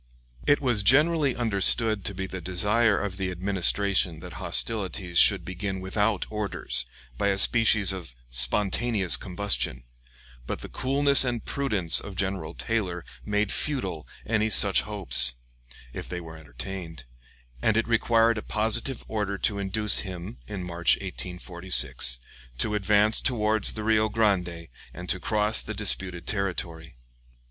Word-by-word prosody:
It 145 - +3
was 120 -6 0
generally 145 +4 +3
understood 110 -1 +3
to 100 - -2
be 95 +1 -4
the 95 -1 -7
desire 105 +5 +1
of 100 -2 -5
the 95 -1 -3
Administration 95 -1 0
that - - -10
hostilities 95 -5 +1
should 95 -5 +4
begin 95 +2 -5
without 105 +2 -1
orders, 105 - 0 0.3
by - - 0
a 100 -1 0
species 110 -2 +4
of 85 -10 -9 0.2
spontaneous 95 - +2
combustion; 90 -5 -2 0.6
but - - -5
the - - -9
coolness 140 +1 +3
and 120 -3 -3
prudence 105 -12 +2
of 100 - -9
General 95 -4 -3
Taylor 95 -7 -3 0.2
made 105 +5 -1
futile 95 - -2 0.2
any 110 -1 0
such 100 -2 +3
hopes, 90 - 0 0.6
if - - -8
they 90 - -5
were 80 -2 -11
entertained, 80 +2 -9 0.6
and 110 +6 +1
it 115 - 0
required 115 -1 +2
a - - -7
positive 115 +5 0
order 105 -2 -3
to 100 +1 -2
induce 100 +1 +1
him, 95 +3 -7
in 100 -3 -6
March, 85 -1 +2
1846, 90 -7 +1 0.4
to 105 - -2
advance 105 +1 +2
towards 110 -4 +1
the 110 - -6
Rio 110 0 +1
Grande 90 -6 -1 0.3
and 90 0 -9
to 95 - +2
cross 105 +2 +1
the 110 - -7
disputed 95 -4 +2
territory. 85 - -4
100 Hz, 140 wpm, -25 LUFS, 90-110 Hz, 0.6 s, should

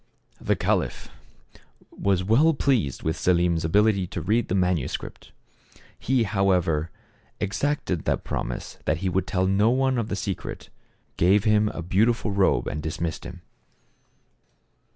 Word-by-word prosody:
The - - 0
caliph - - -1 0.8
was 95 -2 0
well 140 - +4
pleased 125 - 0
with 80 +1 -1
Selim's 85 -1 +1
ability 100 +2 +2
to 85 - -5
read 110 +6 +1
the 95 - -1
manuscript. 90 -7 -2 0.7
He 130 -1 +1
however 90 -6 +1 0.5
exacted 100 - -2
the - - +1
promise - - -5
that 75 - +1
he - - +2
would 95 +2 -1
tell 95 -1 0
no 100 +4 +3
one 130 0 +1
of 110 - -2
the 105 - -3
secret, 95 -1 -5 0.5
gave 95 +4 +4
him 105 -1 +3
a 85 - -6
beautiful 105 +5 +1
robe 100 -1 +2
and 75 - -4
dismissed 80 +2 -4
him. - - -9
95 Hz, 135 wpm, -25 LUFS, 85-110 Hz, 0.8 s, well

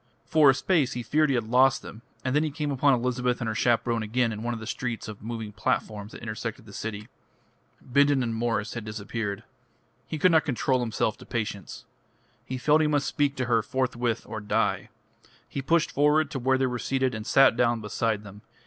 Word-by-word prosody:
For 155 -3 +5
a 135 - +5
space 150 -5 +1
he 120 - -4
feared 155 +4 +2
he 135 - +2
had 120 - +1
lost 125 +4 +3
them, 110 - -10 0.2
and 130 +1 0
then 150 - +4
he 155 - 0
came 150 0 -3
upon 140 0 +3
Elizabeth 125 0 -1
and 120 - -3
her 110 - -1
chaperone 115 0 +1
again 115 +2 0
in 105 -1 -5
one 120 +1 -2
of - - -7
the 110 - -8
streets 120 0 -4
of 105 -2 -8
moving 110 -1 -5
platforms 105 0 -2
that - - -10
intersected 115 0 -5
the 100 - -13
city. 105 0 -5 0.8
Bindon 140 +1 +3
and 115 -1 -2
Mwres 115 -2 -1
had 115 - -5
disappeared. 105 -1 -4 0.6
He 160 - -4
could 180 +4 +4
not 160 -1 +5
control 135 -2 0
himself 110 -2 -1
to - - -12
patience. 105 -4 -4 0.6
He 130 - -3
felt 150 +4 +3
he 155 - +3
must 145 -2 +1
speak 145 -1 0
to 130 -2 -1
her 115 -2 +2
forthwith, 120 -1 -1
or 110 - -6
die. 105 - 0 0.6
He 140 - -4
pushed 165 +4 +2
forward 150 +1 +3
to 135 - -3
where 130 +1 +2
they 130 - +1
were 125 -1 -2
seated, 130 -1 0
and 110 0 -6
sat 135 -3 +5
down 120 -1 +2
beside 110 0 -1
them. 105 0 -12
120 Hz, 210 wpm, -27 LUFS, 110-135 Hz, 0.8 s, For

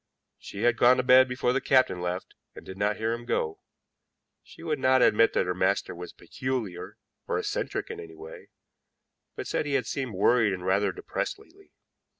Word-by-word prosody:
She 100 - -7
had 120 -1 +3
gone 125 +1 +6
to 125 - +1
bed 130 +1 +6
before 125 -1 0
the 135 - 0
captain 130 -9 +2
left, 90 +1 -4 0.2
and - - -11
did 95 - -8
not 100 +1 0
hear 110 +1 -1
him 120 0 -6
go. 80 -8 -2 0.8
She - - -15
would 155 -3 -2
not 130 0 +4
admit 115 +2 +4
that - - +1
her 90 - -1
master 95 +2 0
was 90 0 -8
peculiar 120 -9 -5 0.3
or - - -1
eccentric - - -3
in - - -7
any 80 -1 -10
way, 80 0 -12 0.9
but - - -6
said 150 - -2
he 140 - 0
had 130 -4 0
seemed 130 -3 -4
worried 110 +1 +3
and 90 -1 -6
rather 95 +1 +2
depressed - - -4
lately. - - -21
110 Hz, 190 wpm, -27 LUFS, 95-130 Hz, 0.9 s, gone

